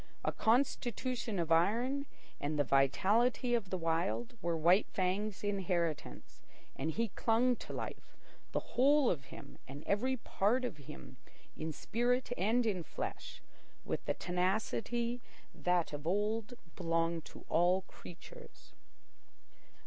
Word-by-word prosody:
A -, -, +2 dB
constitution 240 Hz, -1 st, 0 dB
of 165 Hz, -2 st, -1 dB
iron 240 Hz, -, +2 dB, 0.3 s
and 150 Hz, +2 st, -2 dB
the 145 Hz, -, +4 dB
vitality 205 Hz, -, +3 dB
of 225 Hz, -6 st, +1 dB
the 185 Hz, -, -1 dB
Wild 175 Hz, +9 st, -1 dB
were 170 Hz, -1 st, 0 dB
White 175 Hz, +6 st, +5 dB
Fang's 195 Hz, +3 st, -1 dB
inheritance, 175 Hz, -, -2 dB, 0.3 s
and 145 Hz, +4 st, -2 dB
he 225 Hz, +7 st, 0 dB
clung 235 Hz, +5 st, +2 dB
to -, -, -9 dB
life, -, -, -6 dB, 0.3 s
the -, -, -2 dB
whole 280 Hz, 0 st, +6 dB
of 140 Hz, -6 st, -3 dB
him -, -, -11 dB
and 140 Hz, +3 st, -8 dB
every 255 Hz, +6 st, +1 dB
part 230 Hz, +3 st, +1 dB
of 185 Hz, -, -4 dB
him, 65 Hz, -, -11 dB, 0.4 s
in 160 Hz, +1 st, -3 dB
spirit 245 Hz, -, 0 dB
and 230 Hz, +5 st, +2 dB
in 195 Hz, -5 st, 0 dB
flesh, 160 Hz, -, -6 dB, 0.4 s
with -, -, -2 dB
the -, -, 0 dB
tenacity 220 Hz, +6 st, -1 dB, 0.3 s
that 180 Hz, -3 st, +1 dB
of 145 Hz, +2 st, -5 dB
old 210 Hz, +5 st, 0 dB, 0.2 s
belonged 165 Hz, -1 st, 0 dB
to -, -, -12 dB
all 175 Hz, +3 st, +3 dB
creatures. 190 Hz, -, -13 dB
195 Hz, 130 wpm, -34 LUFS, 165-240 Hz, 0.4 s, whole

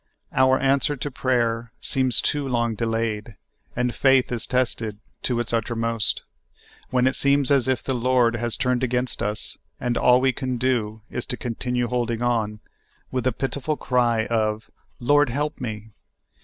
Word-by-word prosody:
Our 130 Hz, 0 st, +4 dB
answer 135 Hz, +2 st, +2 dB
to 145 Hz, +3 st, -4 dB
prayer 120 Hz, -3 st, 0 dB
seems 130 Hz, -2 st, +5 dB
too 145 Hz, -2 st, -1 dB
long 120 Hz, -2 st, 0 dB
delayed, 115 Hz, -1 st, -2 dB, 0.4 s
and 125 Hz, 0 st, 0 dB
faith 135 Hz, -2 st, +3 dB
is 120 Hz, -2 st, -2 dB
tested 115 Hz, -4 st, -1 dB, 0.2 s
to 125 Hz, -2 st, -1 dB
its 120 Hz, 0 st, -2 dB
uttermost, 115 Hz, -1 st, 0 dB, 0.7 s
when 125 Hz, -1 st, +2 dB
it 130 Hz, -, +2 dB
seems 140 Hz, -1 st, +3 dB
as 135 Hz, -3 st, +3 dB
if 130 Hz, -3 st, 0 dB
the 135 Hz, -, -1 dB
I^ord 125 Hz, -1 st, +2 dB
has 120 Hz, -1 st, -1 dB
turned 125 Hz, 0 st, 0 dB
against 125 Hz, 0 st, -1 dB
us 105 Hz, +1 st, -3 dB, 0.2 s
and 120 Hz, -1 st, -1 dB
all 125 Hz, 0 st, +5 dB
we 130 Hz, 0 st, +3 dB
can 130 Hz, -2 st, -3 dB
do 115 Hz, -4 st, -1 dB
is 120 Hz, -, -3 dB
to 125 Hz, -, -1 dB
continue 125 Hz, 0 st, -2 dB
holding 120 Hz, -1 st, -1 dB
on, 110 Hz, -3 st, -1 dB, 0.5 s
with 130 Hz, -1 st, -2 dB
the 130 Hz, -, +3 dB
pitiful 140 Hz, +4 st, -2 dB
cry 120 Hz, -3 st, +1 dB
of 110 Hz, -1 st, -1 dB, 0.2 s
" -, -, -41 dB
lyord, 145 Hz, +2 st, +3 dB
help 145 Hz, +5 st, -3 dB
me!" 110 Hz, -2 st, -6 dB
125 Hz, 165 wpm, -23 LUFS, 115-130 Hz, 0.7 s, seems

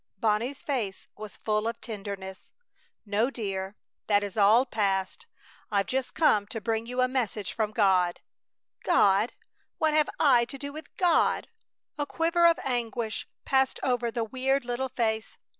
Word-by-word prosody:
Bonnie's 225 Hz, +6 st, 0 dB
face 230 Hz, -9 st, -3 dB
was 215 Hz, -1 st, -9 dB
full 215 Hz, 0 st, 0 dB
of 230 Hz, 0 st, -3 dB
tenderness. 200 Hz, -3 st, -7 dB, 0.5 s
"No, 215 Hz, +4 st, +1 dB
dear! 195 Hz, -5 st, -4 dB, 0.3 s
That 205 Hz, -1 st, +3 dB
is 200 Hz, -2 st, -5 dB
all 220 Hz, +4 st, +5 dB
passed. 195 Hz, -, -1 dB, 0.4 s
I've 200 Hz, -2 st, +1 dB
just 260 Hz, 0 st, -2 dB
come 215 Hz, -11 st, +3 dB
to 225 Hz, -, -5 dB
bring 225 Hz, +2 st, -2 dB
you 250 Hz, +1 st, -1 dB
a 255 Hz, -, +4 dB
message 230 Hz, -6 st, -2 dB
from 220 Hz, -2 st, 0 dB
God." 185 Hz, -5 st, +2 dB, 0.6 s
"God! 210 Hz, -, +3 dB, 0.4 s
What 315 Hz, -1 st, +2 dB
have 305 Hz, -1 st, +3 dB
I 250 Hz, -5 st, +5 dB
to 275 Hz, -, -8 dB
do 285 Hz, +1 st, -6 dB
with 310 Hz, -1 st, -8 dB
God?" 350 Hz, -3 st, +2 dB, 0.5 s
A 290 Hz, -, -1 dB
quiver 335 Hz, +2 st, +3 dB
of 335 Hz, -, +4 dB
anguish 235 Hz, -3 st, -2 dB, 0.2 s
passed 265 Hz, -1 st, +2 dB
over 245 Hz, -2 st, +1 dB
the 230 Hz, 0 st, -2 dB
weird 260 Hz, +3 st, 0 dB
little 250 Hz, +2 st, -2 dB
face. 220 Hz, -3 st, -2 dB
230 Hz, 155 wpm, -28 LUFS, 205-265 Hz, 0.6 s, all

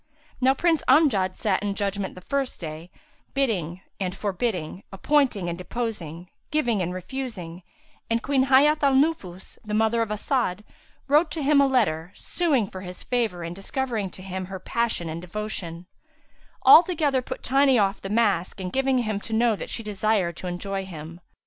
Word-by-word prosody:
Now 265 Hz, +1 st, +4 dB
Prince 330 Hz, -1 st, +2 dB
Amjad 220 Hz, -, +4 dB
sat 200 Hz, -3 st, 0 dB
in 205 Hz, -1 st, -2 dB
judgement 200 Hz, -1 st, -2 dB
the 185 Hz, -, -10 dB
first 275 Hz, +5 st, -2 dB
day, 160 Hz, +1 st, -7 dB, 0.5 s
bidding 190 Hz, -, -1 dB, 0.2 s
and 190 Hz, 0 st, -3 dB
forbidding, 190 Hz, -4 st, -2 dB
appointing 225 Hz, -2 st, +1 dB
and 170 Hz, -, -2 dB
deposing, 180 Hz, -3 st, -5 dB, 0.2 s
giving 240 Hz, -10 st, +1 dB
and 180 Hz, 0 st, -1 dB
refusing; 185 Hz, -3 st, -6 dB, 0.5 s
and 230 Hz, 0 st, 0 dB
Queen 270 Hz, -2 st, +2 dB
Hayat 290 Hz, +3 st, +5 dB
al 275 Hz, -2 st, +4 dB
Nufus, 265 Hz, -, -1 dB
mother 220 Hz, +2 st, +1 dB
of 225 Hz, -, -1 dB
As'ad, 210 Hz, -2 st, -1 dB, 0.4 s
wrote 300 Hz, +4 st, +4 dB
to 315 Hz, -, -4 dB
him 285 Hz, 0 st, +5 dB
a 280 Hz, -, +4 dB
letter 180 Hz, -10 st, +1 dB
suing 300 Hz, -10 st, +1 dB
for 185 Hz, -1 st, -8 dB
his 180 Hz, -1 st, -8 dB
favour 225 Hz, -8 st, -1 dB
and 170 Hz, +1 st, -5 dB
discovering 220 Hz, 0 st, -2 dB
to 185 Hz, -, -11 dB
him 190 Hz, 0 st, -4 dB
her 190 Hz, +1 st, -6 dB
passion 225 Hz, -3 st, -1 dB
and 160 Hz, +1 st, -5 dB
devotion; 180 Hz, -3 st, -5 dB, 0.8 s
altogether 310 Hz, -6 st, +6 dB
put -, -, -7 dB
tiny 270 Hz, -1 st, +4 dB
off 200 Hz, -2 st, +1 dB
the 195 Hz, -, -6 dB
mask 205 Hz, -4 st, +1 dB
and 180 Hz, -1 st, -5 dB
giving 270 Hz, 0 st, +2 dB
him 215 Hz, -4 st, -1 dB
to 225 Hz, -, -7 dB
know 230 Hz, 0 st, +3 dB
that -, -, -7 dB
she 230 Hz, -, -3 dB
desired 210 Hz, -4 st, 0 dB
to 185 Hz, -, -6 dB
enjoy 195 Hz, +2 st, -3 dB
him. 170 Hz, -1 st, -9 dB
210 Hz, 170 wpm, -25 LUFS, 180-265 Hz, 0.8 s, altogether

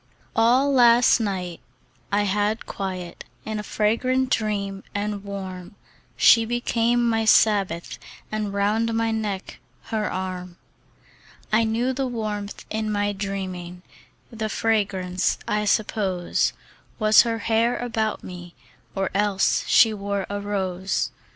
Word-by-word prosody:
ALL 255 Hz, +5 st, +4 dB
last 240 Hz, -1 st, +6 dB
night 185 Hz, -5 st, -3 dB, 0.5 s
I 205 Hz, +1 st, +2 dB
had 205 Hz, +2 st, 0 dB
quiet 185 Hz, -3 st, -5 dB, 0.2 s
In 215 Hz, -1 st, -3 dB
a -, -, -2 dB
fragrant 255 Hz, +5 st, 0 dB
dream 200 Hz, -3 st, -1 dB
and 205 Hz, 0 st, -2 dB
warm: 190 Hz, -2 st, -7 dB, 0.4 s
She 230 Hz, -, +6 dB
became 240 Hz, 0 st, +1 dB
my 225 Hz, -1 st, +1 dB
Sabbath, 200 Hz, -6 st, +2 dB, 0.3 s
And 215 Hz, -1 st, -2 dB
round 215 Hz, +3 st, 0 dB
my 225 Hz, 0 st, +1 dB
neck, 210 Hz, -3 st, -4 dB, 0.3 s
her 215 Hz, -1 st, 0 dB
arm. 185 Hz, -1 st, -5 dB, 1.0 s
I 225 Hz, +1 st, +4 dB
knew 235 Hz, +4 st, 0 dB
the 265 Hz, 0 st, -1 dB
warmth 210 Hz, -4 st, -4 dB
in 215 Hz, 0 st, -2 dB
my 205 Hz, 0 st, 0 dB
dreaming; 185 Hz, -3 st, -5 dB, 0.5 s
The 220 Hz, -1 st, -3 dB
fragrance, 195 Hz, -5 st, 0 dB
I 210 Hz, 0 st, 0 dB
suppose, 195 Hz, -4 st, 0 dB, 0.4 s
Was 215 Hz, 0 st, +6 dB
her 230 Hz, -1 st, -1 dB
hair 230 Hz, +2 st, +1 dB
about 225 Hz, -3 st, -2 dB
me, 175 Hz, -1 st, -9 dB, 0.4 s
Or 195 Hz, -1 st, -1 dB
else 200 Hz, -1 st, +2 dB
she 225 Hz, -2 st, +5 dB
wore 200 Hz, -1 st, -3 dB
a 205 Hz, 0 st, -3 dB
rose. 190 Hz, -2 st, -2 dB
210 Hz, 125 wpm, -24 LUFS, 195-225 Hz, 1.0 s, last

